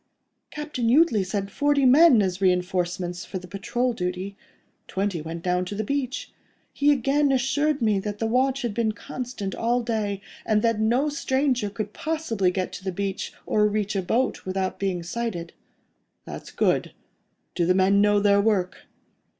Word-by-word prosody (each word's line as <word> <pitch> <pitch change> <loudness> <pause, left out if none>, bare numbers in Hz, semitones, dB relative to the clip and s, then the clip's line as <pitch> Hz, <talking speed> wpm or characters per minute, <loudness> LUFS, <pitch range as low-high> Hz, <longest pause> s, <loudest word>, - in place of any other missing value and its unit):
"Captain 295 -6 -3
Jutley 250 - +4
sent 195 +1 -3
forty 290 -1 +2
men 260 -3 +7
as 185 0 -2
reinforcements 180 -1 0
for 190 - -6
the 185 0 -9
patrol 240 +7 -1
duty: 185 0 -4 0.5
twenty 190 -3 -2
went 165 +2 -6
down 180 0 +1
to 205 - -5
the 215 - -2
beach. 265 +2 -3 0.4
He 290 +1 +3
again 280 +1 +2
assured 275 +2 +1
me 210 -3 +3
that 205 +1 -4
the 225 - -2
watch 260 +3 +1
has 240 - -1
been 220 0 0
constant 230 -2 -6
all 240 +1 0
day, 215 -4 -2 0.2
and 215 0 +1
that 230 -2 +2
no 240 +7 +2
stranger 265 -5 0
could 205 +1 -5
possibly 310 - -1
get 185 0 -3
to - - -8
the 190 - -2
beach, 195 +1 -3
or 210 0 +3
reach 210 -1 -1
a 195 - +1
boat, 235 +8 0
without 190 0 -2
being 185 -3 -1
sighted." 175 -3 -4 0.7
"That's - - -8
good.—Do 175 - -3
the 185 - +4
men 195 +1 +4
know 205 0 +4
their 200 0 +4
work?" 200 -4 0
210 Hz, 165 wpm, -25 LUFS, 190-250 Hz, 0.7 s, men